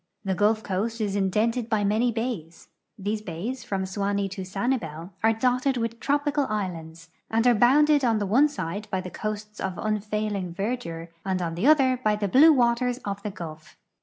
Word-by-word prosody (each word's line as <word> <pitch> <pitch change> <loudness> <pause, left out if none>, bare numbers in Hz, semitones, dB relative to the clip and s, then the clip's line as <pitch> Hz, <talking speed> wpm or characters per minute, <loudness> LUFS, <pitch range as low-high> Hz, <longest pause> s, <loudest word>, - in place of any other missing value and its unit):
The 190 - +1
Gulf 215 +3 +2
coast 210 +4 -2
is 205 -2 -1
indented 220 +5 0
by 215 -2 +1
many 220 +4 +2
bays. 220 -8 -5 0.3
These 210 +2 -2
ba}"s, 215 +7 -5
from 195 -5 -2
Suwanee 200 +1 -1
to 195 0 -5
Sanibel, 185 -4 -3
are 225 - +5
dotted 255 +3 +1
with 230 0 -3
tropical 290 0 +1
islands, 170 -5 -5 0.2
and 225 +1 +1
are 245 - +6
bounded 285 +6 +4
on 230 -3 +3
the 205 - -1
one 260 +10 +4
side 205 - -5
by 190 - -1
coasts 210 +3 -6
of 190 -2 -3
unfailing 210 -4 -2
verdure 195 -6 -4
and 190 -1 -1
on 170 -2 -2
the 180 +10 0
other 265 -4 +5
by 215 -1 +3
the 210 -1 -1
blue 290 - +7
waters 245 -2 +2
of 200 0 -3
the 210 - -3
Gulf. 160 -5 -9
210 Hz, 180 wpm, -26 LUFS, 190-240 Hz, 0.3 s, blue